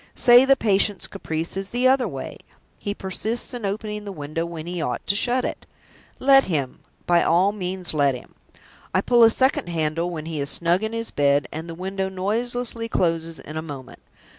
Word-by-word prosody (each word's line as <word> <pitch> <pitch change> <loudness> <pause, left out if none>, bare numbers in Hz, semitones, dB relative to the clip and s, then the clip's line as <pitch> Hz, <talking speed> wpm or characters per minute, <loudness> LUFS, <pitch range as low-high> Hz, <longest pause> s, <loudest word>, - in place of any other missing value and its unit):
Say 245 +1 +7
the 275 0 +5
patient's 205 -4 +1
caprice 160 +2 -4
is 195 0 -4
the 245 +2 +2
other 260 -2 +3
way 135 -8 -6 0.4
he 205 0 -3
persists 220 +7 -3
in 235 -5 -3
opening 210 +1 -4
the 205 - -6
window 155 0 -4
when 165 -2 -7
he 175 -1 -4
ought 125 -5 -3
to 200 - +1
shut 245 +4 +1
it. - - -5 0.5
Let 270 0 +5
him! 145 -8 -2 0.3
by 175 -1 +4
all 180 +4 +3
means, 185 -3 -3
let 140 -3 +2
him! 125 - -12 0.6
I 185 - +4
pull 240 +3 +3
a 225 - +8
second 260 -6 +1
handle 165 +1 -1
when 160 -3 -6
he 160 -2 -4
is 140 - -1
snug 170 +4 +2
in 220 0 -2
his 230 0 -3
bed, 140 0 +2
and 160 +2 -6
the 165 - -6
window 190 +2 -3
noiselessly 230 +4 -3
closes 165 -4 0
in 155 - -8
a - - -2
moment. 145 -5 -9
185 Hz, 195 wpm, -23 LUFS, 160-225 Hz, 0.6 s, a